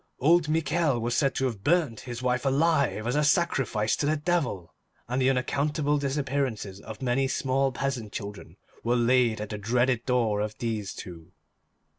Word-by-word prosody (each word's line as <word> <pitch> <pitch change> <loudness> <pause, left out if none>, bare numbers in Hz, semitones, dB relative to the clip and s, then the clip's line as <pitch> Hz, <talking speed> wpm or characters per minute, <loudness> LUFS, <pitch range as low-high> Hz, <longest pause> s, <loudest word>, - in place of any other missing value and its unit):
Old 160 +3 +4
Michel 155 -4 +1
was 120 +1 -1
said 135 -2 +2
to 135 - 0
have 110 -6 -3
burnt 155 -8 +2
his 120 -1 -7
wife 125 0 +1
alive 140 -4 +2
as 120 +3 0
a 150 - +2
sacrifice 135 -9 +1
to 145 - 0
the 155 +1 +2
Devil, 145 - -1 0.3
and 125 +2 -1
the 130 - +4
unaccountable 145 +3 0
disappearances 135 -8 -2
of 110 +4 -9
many 130 +2 +1
small 135 0 0
peasant 125 -5 -3
children 100 -1 -7 0.3
were 120 +1 +1
laid 120 -2 +3
at 105 -1 -5
the 105 - -5
dreaded 120 +3 +1
door 115 -5 +1
of 105 0 -4
these 110 -4 -3
two. 85 -1 -10
125 Hz, 170 wpm, -27 LUFS, 110-145 Hz, 0.3 s, Old